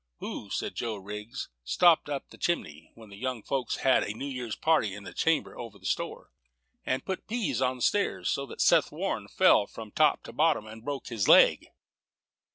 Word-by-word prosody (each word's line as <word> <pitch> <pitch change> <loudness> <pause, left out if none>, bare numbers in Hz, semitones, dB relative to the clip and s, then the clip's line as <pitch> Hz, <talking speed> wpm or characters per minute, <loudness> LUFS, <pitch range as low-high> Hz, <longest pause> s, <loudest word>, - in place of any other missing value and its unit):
"Who," - - -6
said - - -3
Joe 115 -2 -3
Riggs, 105 +3 -7 0.2
"stopped 165 - +4
up 140 -2 -4
the - - -13
chimney, 80 - -2
when 110 -2 -14
the 100 - -12
young 125 -1 -3
folks 135 -3 -2
had 130 - +5
a 105 - -3
New 135 - -5
Year's 125 -5 -4
party 150 -12 +1
in 100 - -9
the - - -9
chamber 165 -1 0
over 115 -4 -8
the 95 - -18
store, - - -3 0.5
and 130 - -2
put 190 -1 -4
peas 205 - -1
on 130 0 +1
the 125 - -12
stairs, 205 -1 +1
so 140 0 -1
that - - -6
Seth - - +4
Warren - - -3
fell 100 - +4
from 110 -2 -10
top 155 +3 +3
to - - -10
bottom, 155 -8 +2
and 110 +1 -11
broke 140 -1 -5
his 115 -5 -1
leg?" - - +6
125 Hz, 200 wpm, -28 LUFS, 105-145 Hz, 0.5 s, leg